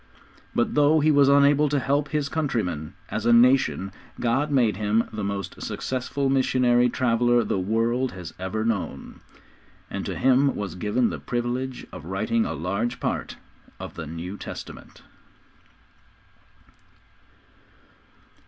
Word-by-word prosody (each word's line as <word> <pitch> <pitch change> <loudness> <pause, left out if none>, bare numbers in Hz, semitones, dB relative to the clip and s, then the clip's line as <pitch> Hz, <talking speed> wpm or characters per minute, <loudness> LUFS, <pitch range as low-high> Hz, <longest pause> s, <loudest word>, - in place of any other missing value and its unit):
But 120 - +1
though 150 +2 +4
he 155 +1 +4
was 140 -1 +5
unable 140 +1 +5
to 145 - +1
help 140 +2 0
his 150 -2 -1
countrymen, 110 - -2
as 110 +1 -2
a - - +5
nation, 120 -5 +4 0.3
God 130 +6 +1
made 125 -7 +2
him 110 +2 +1
the 105 -1 -4
most 100 -2 -4
successful 130 +2 -2
missionary 125 -2 +3
traveller 120 -1 +2
the 100 - -1
world 115 +6 0
has 90 -3 -8
ever 95 +4 -2
known, 110 -5 -3 0.7
and - - -3
to - - -3
him 135 +1 +3
was 100 -5 -4
given 105 +6 0
the - - -5
privilege 125 +1 -3
of 85 -4 -9
writing 110 +5 0
a - - -3
large 100 - -2
part - - -3 0.4
of - - -7
the 80 - -7
New 85 +5 -6
Testament. - - -9
120 Hz, 135 wpm, -25 LUFS, 105-135 Hz, 0.7 s, was